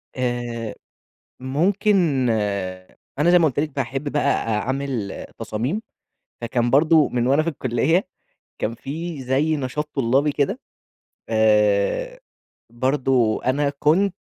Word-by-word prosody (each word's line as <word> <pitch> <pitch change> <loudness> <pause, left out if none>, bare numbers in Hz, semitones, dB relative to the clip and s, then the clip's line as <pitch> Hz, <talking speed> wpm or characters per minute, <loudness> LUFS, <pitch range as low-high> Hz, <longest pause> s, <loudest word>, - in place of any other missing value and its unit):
آآ 120 -3 -3 0.6
ممكن 165 - +1 0.9
أنا 170 +4 +4
زي 180 - +6
ما 165 - +4
قُلت 145 -3 0
لِك 150 +1 0
باحب 135 +2 -2
بقى 145 - 0
أ 110 -2 0
أعمل 130 -5 -3
تصاميم، 125 - -2 0.6
فكان 120 0 0
برضه 155 +3 +5
من 120 -1 -1
وأنا 140 +4 +3
في 165 - -3
الكلية 155 - 0 0.5
كان 115 - -1
في 155 +4 -6
زي 140 +5 +1
نشاط 150 +2 -3
طلابي 135 +3 +2
كده، 140 -1 -1 0.7
آآ 110 - +2 0.5
برضه 130 -2 +1
أنا 140 +3 +1
كنت 180 +5 +2
135 Hz, 120 wpm, -22 LUFS, 120-155 Hz, 0.9 s, زي